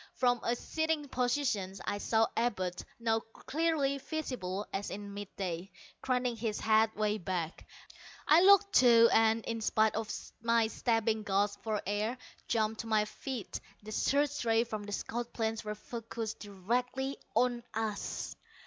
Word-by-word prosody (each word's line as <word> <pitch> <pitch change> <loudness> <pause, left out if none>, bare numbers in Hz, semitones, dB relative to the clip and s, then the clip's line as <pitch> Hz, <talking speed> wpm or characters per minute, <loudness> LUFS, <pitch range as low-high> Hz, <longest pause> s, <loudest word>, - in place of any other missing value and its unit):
From 245 -1 +2
a 235 - +1
sitting 315 +2 -1
position 245 -7 0
I 205 - -1
saw 220 +1 +3
Abud, 185 -7 -1 0.2
now 225 -1 +2
clearly 280 +4 -1
visible 245 - -3
as 195 +1 -2
in 200 0 -6
midday, 195 -3 -5 0.3
craning 250 -2 0
his 220 -1 -2
head 220 0 +3
way 215 0 0
back. 175 -2 -3 0.6
I 315 +3 +7
looked, 400 +1 +6
too 235 -2 +7
and, 225 0 +4
in 230 -1 -3
spite 220 0 +3
of 220 -1 -3 0.3
my 230 0 +3
stabbing 225 -1 +1
gasps 205 0 0
for 215 -2 -1
air, 210 +5 -1 0.3
jumped 220 -1 0
to 230 - -9
my 215 -1 +3
feet. 250 0 -5 0.3
_The 215 - -6
search 290 +4 +1
rays 230 0 +3
from 215 -2 -4
the 205 - -7
scout 235 +3 -4
planes 225 0 -1
were 210 0 -4
focussed 225 0 -6
directly 245 +7 -2 0.2
on 245 -1 +2
us! 220 -2 -3
225 Hz, 150 wpm, -32 LUFS, 210-245 Hz, 0.6 s, I